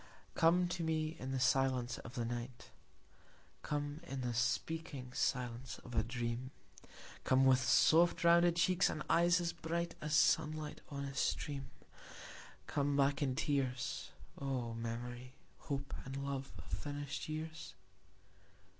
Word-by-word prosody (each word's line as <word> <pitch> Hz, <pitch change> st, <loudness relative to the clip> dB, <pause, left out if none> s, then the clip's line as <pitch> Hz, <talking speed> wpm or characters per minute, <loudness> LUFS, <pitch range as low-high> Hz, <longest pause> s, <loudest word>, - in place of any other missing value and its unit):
Come 175 Hz, +2 st, +4 dB
to 175 Hz, -1 st, -2 dB
me 160 Hz, 0 st, 0 dB
in 130 Hz, +1 st, -4 dB
the 135 Hz, -, -1 dB
silence 130 Hz, -1 st, +2 dB
of 115 Hz, -, -10 dB
the 120 Hz, -, -1 dB
night; 120 Hz, +1 st, -6 dB, 0.9 s
Come 145 Hz, 0 st, -3 dB
in 135 Hz, -4 st, -4 dB
the 125 Hz, -1 st, -1 dB
speaking 130 Hz, +2 st, -2 dB
silence 125 Hz, -1 st, -1 dB
of 120 Hz, -, -9 dB
a 110 Hz, -, +3 dB
dream; 120 Hz, +2 st, -3 dB, 0.7 s
Come 130 Hz, +1 st, +4 dB
with 130 Hz, -1 st, +6 dB
soft 165 Hz, +8 st, +5 dB
rounded 170 Hz, 0 st, +6 dB
cheeks 180 Hz, +2 st, +3 dB
and 155 Hz, -, -3 dB
eyes 175 Hz, +1 st, +5 dB
as 170 Hz, -1 st, -1 dB
bright 170 Hz, +1 st, -2 dB
As 150 Hz, 0 st, 0 dB
sunlight 155 Hz, -1 st, +2 dB
on 140 Hz, -1 st, -4 dB
a 140 Hz, -, -5 dB
stream; 140 Hz, 0 st, -1 dB, 1.0 s
Come 140 Hz, 0 st, 0 dB
back 140 Hz, +1 st, +3 dB
in 130 Hz, -3 st, +1 dB
tears, 135 Hz, -4 st, -1 dB, 0.3 s
O 130 Hz, -4 st, -2 dB
memory, 120 Hz, +2 st, -5 dB, 0.2 s
hope 140 Hz, -1 st, -4 dB
and 135 Hz, +1 st, -6 dB
love 135 Hz, -1 st, -3 dB
of -, -, -9 dB
finished 145 Hz, 0 st, -4 dB
years. 155 Hz, +1 st, -5 dB
140 Hz, 135 wpm, -36 LUFS, 125-155 Hz, 1.0 s, with